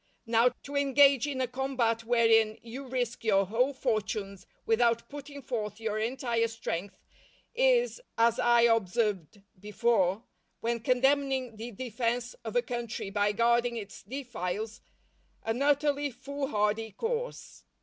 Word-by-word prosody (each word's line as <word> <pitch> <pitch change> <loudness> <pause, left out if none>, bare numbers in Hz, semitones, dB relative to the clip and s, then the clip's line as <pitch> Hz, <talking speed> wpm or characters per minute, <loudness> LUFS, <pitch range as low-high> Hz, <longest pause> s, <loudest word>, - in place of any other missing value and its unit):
Now, 230 +1 +4
to 285 - -8
engage 280 -1 +5
in 270 -3 -2
a 255 - +1
combat 250 -3 -1
wherein 225 -2 +4
you 255 +4 -8
risk 245 -2 -2
your 195 -3 +3
whole 240 +8 +1
fortunes 210 -6 -3 0.2
without 235 0 +2
putting 285 -1 -9
forth 215 -4 -4
your 215 -1 -2
entire 235 0 0
strength, 200 -4 -5 0.6
is, - - +2 0.2
as 230 0 +3
I 240 0 +5
observed 210 -4 +1 0.2
before, 210 -1 +1 0.4
when 235 +1 -1
condemning 265 0 +1
the 225 +3 -6
defence 240 +1 -2
of 220 -1 -6
a 245 - +3
country 235 -5 -4
by 205 0 +2
guarding 235 +2 +2
its 205 -3 -8
defiles, 220 -5 -5 0.6
an 225 +3 -2
utterly 290 0 +2
foolhardy 225 -5 -2
course. 470 - -4
235 Hz, 130 wpm, -29 LUFS, 220-265 Hz, 0.6 s, engage